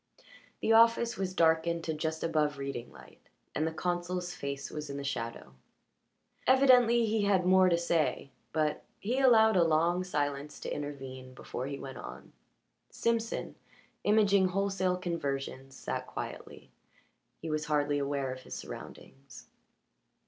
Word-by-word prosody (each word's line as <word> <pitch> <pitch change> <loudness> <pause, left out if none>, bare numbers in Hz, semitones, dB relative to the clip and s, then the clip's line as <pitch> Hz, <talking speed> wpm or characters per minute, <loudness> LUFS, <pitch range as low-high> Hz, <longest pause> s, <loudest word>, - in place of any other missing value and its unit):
The 225 - +3
office 230 +1 +5
was 185 -1 -3
darkened 165 0 +2
to 160 - -2
just 160 +1 -3
above 150 -3 +1
reading 135 -3 -5
light, - - -16 0.3
and 155 - 0
the - - -2
consul's 175 +1 -2
face 140 -4 -5
was 150 -1 -6
in 140 - -5
the 140 - -5
shadow. 115 - -4 0.9
Evidently 250 -3 +6
he 220 0 +1
had 190 -3 +2
more 185 0 +6
to 170 - +3
say, 165 -4 0 0.2
but 155 -1 0 0.2
he 240 +6 -1
allowed 220 -5 +6
a 180 - +5
long 165 +3 +2
silence 145 -4 -3
to - - -4
intervene 130 -3 -7
before 125 +1 -5
he 140 0 -4
went 130 -2 -8
on. - - -10 0.6
Simpson, 230 -1 -1 0.5
imaging 200 -2 +4
wholesale 190 -1 0
conversions, 135 -6 -4
sat - - -4
quietly; - - -8 0.7
he 160 - -5
was 155 0 -1
hardly 145 -1 +1
aware 140 -2 -1
of 130 - -10
his - - -8
surroundings. 70 0 -10
160 Hz, 140 wpm, -31 LUFS, 140-190 Hz, 0.9 s, Evidently